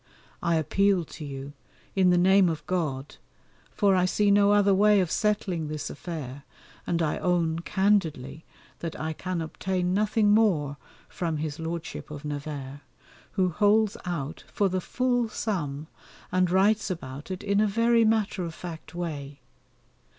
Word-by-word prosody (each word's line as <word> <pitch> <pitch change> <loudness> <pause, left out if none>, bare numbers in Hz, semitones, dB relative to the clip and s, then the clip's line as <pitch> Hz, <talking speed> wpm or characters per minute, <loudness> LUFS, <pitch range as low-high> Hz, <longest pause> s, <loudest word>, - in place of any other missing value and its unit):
I 170 -1 +1
appeal 180 +3 +2
to 155 - -10
you 140 0 -7 0.4
in 190 -2 +4
the 180 - +4
name 190 +1 +5
of 160 -2 -4
God, 150 -7 -2 0.5
for 200 -2 +2
I 180 -1 +3
see 205 +2 +2
no 200 0 +5
other 205 -1 +4
way 205 +1 +5
of 180 -4 0
settling 195 -7 0
this 155 0 -4
affair, 145 -5 -6 0.5
and 170 -1 +1
I 150 - -1
own 170 -2 +1
candidly 170 -6 0 0.4
that 165 -1 -5
I 160 +1 -2
can 185 +1 -3
obtain 180 +2 -2
nothing 210 +1 +2
more 170 -10 +2 0.3
from 165 -3 -3
his 155 0 -4
Lordship 165 0 -5
of 150 0 -8
Nevers, 145 -2 -5 0.5
who 185 -3 +2
holds 210 +3 +3
out 160 -4 -4
for 200 -2 +1
the 185 0 -1
full 245 +2 0
sum 155 -10 -3 0.5
and 185 -1 +2
writes 205 +4 +3
about 145 -4 -6
it 185 -1 -5
in 200 0 +2
a 215 - +3
very 230 +3 +3
matter 215 -3 +1
of 165 -2 -5
fact 170 -1 -9
way. 145 -5 -5
180 Hz, 155 wpm, -27 LUFS, 155-200 Hz, 0.5 s, name